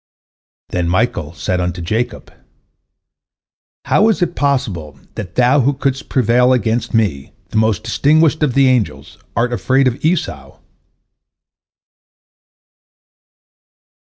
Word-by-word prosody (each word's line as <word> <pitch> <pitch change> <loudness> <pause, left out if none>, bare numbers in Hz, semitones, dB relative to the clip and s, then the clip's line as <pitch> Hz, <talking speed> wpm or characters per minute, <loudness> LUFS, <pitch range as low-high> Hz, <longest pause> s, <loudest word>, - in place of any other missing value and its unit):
Then 90 -1 -1
Michael 90 -5 0
said 90 +5 -2
unto 90 0 -3
Jacob, 110 +7 -3 1.5
"How 215 +2 +3
is 205 -4 +1
it 175 - -3
possible 100 - -2
that 90 -4 -7
thou 125 +3 +4
who 140 +3 +1
couldst 135 0 -2
prevail 125 0 +3
against 120 -1 -1
me, 95 -12 -1 0.2
the - - -3
most 110 -1 +1
distinguished 150 +7 +2
of 145 -5 +1
the 135 -1 +5
angels, 125 -6 -1 0.2
art 120 +2 0
afraid 130 +2 +2
of 125 +1 -3
Esau?" 155 - -2
120 Hz, 110 wpm, -17 LUFS, 95-135 Hz, 1.5 s, the